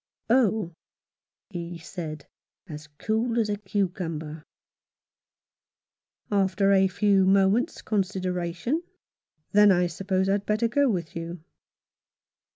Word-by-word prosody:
" - - -54
Oh," 220 -8 +2 0.8
he 175 -1 -6
said, 155 -3 -7 0.4
as 150 -3 -9
cool 225 +4 -1
as 215 -2 +1
a 205 - 0
cucumber, 175 -6 -3 1.9
after 195 0 +2
a 190 -1 +5
few 200 0 +2
moments' 195 +4 +2
consideration, 185 - -1 0.7
"then 210 0 +6
I 180 -1 +3
suppose 190 +2 -1
I'd 200 +1 0
better 215 +2 +2
go 280 +4 +2
with 175 -7 -3
you." 165 0 -6
190 Hz, 105 wpm, -26 LUFS, 175-210 Hz, 1.9 s, then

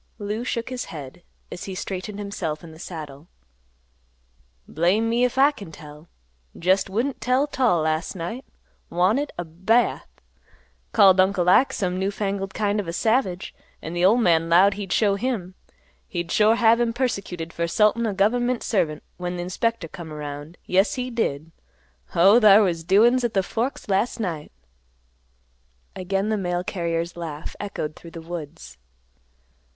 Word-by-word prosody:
Lou 210 +2 -4
shook 235 -1 -3
his 255 -1 -4
head, 150 +2 -9 0.3
as 175 - -7
he 190 - -6
straightened 195 +2 -5
himself 185 -7 -4
in 165 - -10
the 160 - -14
saddle. 155 -4 -8 1.4
"Blame 185 +8 +1
me 235 +2 +1
'f 250 0 0
I 280 +2 +6
kin 200 - -11
tell. 150 +1 -13 0.5
Jest 190 +3 +2
wouldn't 240 +8 -2
tell 255 +3 +2
't 285 -2 -7
all 180 -10 +4
last 155 +4 -1
night. 190 +9 -5 0.5
Wanted 210 +12 +1
a 175 - -3
bath. 190 +9 +1 0.8
Called 195 -3 +6
Uncle 185 -1 +3
Ike 250 +9 +5
some 185 -3 -2
new 190 +1 0
fangled 195 -1 -3
kind 210 -1 0
of 200 - -4
a 170 - -4
savage, 205 -3 0 0.3
an' 165 - -7
th' 175 - -2
old 220 +6 +5
man 165 -4 +3
'lowed 185 +4 +6
he'd 195 -1 -6
show 205 -3 +3
him. 200 -4 -3 0.5
He'd 175 -5 -4
sure 215 +1 +4
have 230 0 +4
him 235 -1 +1
persecuted 190 -10 -3
fer 170 0 -1
'sultin' 215 +5 +2
a 210 - -1
gov'ment 240 +5 +1
servant 160 -8 -1
when 180 0 -4
th' - - -3
inspector 185 +2 -2
come 165 -1 -9
around. 150 +2 -7
Yes 190 +3 +2
he 250 -1 -4
did. 165 -9 -2 0.6
Oh, 195 +7 +6
thar 210 -1 +7
was 170 -4 -1
doin's 230 +8 +4
at 235 -3 -1
the 195 - +3
Forks 235 +7 -3
last 200 +5 0
night!" 165 -8 -4 1.4
Again 195 +3 -1
the 215 - +1
mail 175 -2 -2
carrier's 170 -2 -2
laugh 160 -3 -7
echoed 175 -7 -4
through 170 - -12
the 165 - -9
woods. 150 - -8
190 Hz, 165 wpm, -23 LUFS, 170-225 Hz, 1.4 s, thar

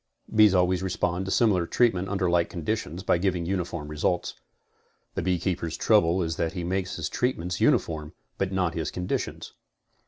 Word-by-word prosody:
Bees 105 -3 +6
always 90 0 +2
respond 95 -1 -1
to 95 - -4
similar 95 -8 +3
treatment 95 -6 +2
under 95 -2 0
like 85 -1 +2
conditions 90 -1 -3
by 85 - +2
giving 90 -2 0
uniform 85 -4 -3
results. 75 +4 -1 0.8
The - - -2
beekeepers' 90 -2 -1
trou 110 -2 +5
ble 85 +3 +1
is 80 -1 -3
that 80 -1 -1
he 90 -2 -4
makes 90 +1 -2
his 80 -3 -3
treatments 90 -8 -2
uniform 75 -2 +1 0.3
but 95 -1 0
not 90 -3 0
his 80 -2 -3
condi 90 0 -1
tions. - - -7
90 Hz, 175 wpm, -26 LUFS, 85-95 Hz, 0.8 s, Bees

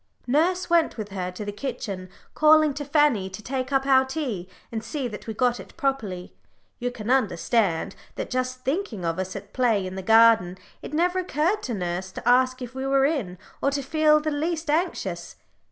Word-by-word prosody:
Nurse 350 +7 +2
went 335 -5 +2
with 210 -2 -5
her 185 -2 -3
to 185 +3 -7
the 205 - -3
kitchen, 200 -5 -5 0.2
calling 310 -1 +5
to 290 +1 -5
Fanny 285 -9 +2
to 190 +3 -9
take 255 +2 -3
up 270 -1 +2
our 265 -1 +5
tea, 260 - -4 0.2
and 225 -1 -4
see 270 +2 -3
that 215 -1 -9
we 220 - -3
got 245 +1 +1
it - - -12
properly; 225 - -2 0.5
you 245 0 -1
can 240 -1 -4
understand 210 -6 +1 0.2
that, - - -5
just 255 0 -2
thinking 265 - -2
of 165 +2 -1
us 185 0 -4
as 200 - -5
at 200 - -29
play 230 -7 +2
in 185 - -5
the 190 - -5
garden, 220 -3 +5 0.2
it - - -8
never 355 +3 +2
occurred 355 +3 0
to 240 - -3
nurse 180 0 -3
to - - -7
ask 255 +1 +3
if 250 0 -8
we 265 +1 -3
were 270 0 +3
in, 250 - -1 0.2
or - - +3
to 280 0 -2
feel 305 +2 +4
the 305 0 -2
least 315 +1 -1
anxious. 340 +4 -2
255 Hz, 200 wpm, -25 LUFS, 205-295 Hz, 0.5 s, calling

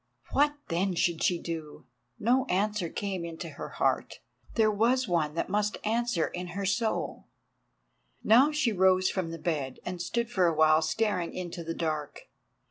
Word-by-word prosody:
What, 290 +1 +3
then, 180 +2 0
should 170 -1 +1
she 175 -2 +2
do? 160 -3 -6 0.3
No 250 +4 +2
answer 205 -3 0
came 195 -2 -3
into 170 0 -6
her 145 - -7
heart. - - +1 0.4
There 220 -2 +4
was 240 +4 +2
one 160 -4 0
that - - -1
must 210 +2 0
answer 225 -5 +1
in 180 0 -5
her 200 - -1
soul. 220 +3 -1 1.0
Now 250 +8 +6
she 300 -6 +1
rose 185 -1 +3
from 185 -4 -2
the 165 - -5
bed 150 -6 -3
and 180 -1 -4
stood 235 +6 -2
for 185 -6 +3
awhile 155 -1 +4
staring 180 +2 -1
into 175 -1 -5
the 165 0 -4
dark. 155 -3 -3
185 Hz, 160 wpm, -29 LUFS, 165-215 Hz, 1.0 s, Now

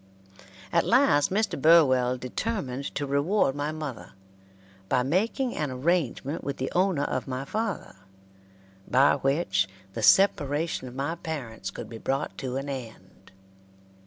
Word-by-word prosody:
At - - +4
last 145 0 +4
Mr. 205 -7 -1
Burwell 130 -6 +5
determined 135 - -3
to 145 - -1
reward 140 +3 +1
my 145 +2 -2
mother, 150 -5 -7 0.8
by 125 - +2
making 220 - 0
an 150 -2 -2
arrangement 145 +1 -1
with 140 - -4
the 130 - -3
owner 180 -5 +2
of 130 - -2
my 130 +1 -4
father, 215 - -3 0.9
by 135 +3 +4
which 135 - +1 0.2
the 115 - -4
separation 150 - +3
of 125 - -10
my 140 +4 -2
parents 130 - -6
could - - -8
be 115 -1 -9
brought 135 +5 -2
to 130 -1 -3
an 135 +1 -4
end. 115 -8 -9
140 Hz, 135 wpm, -27 LUFS, 130-165 Hz, 0.9 s, Burwell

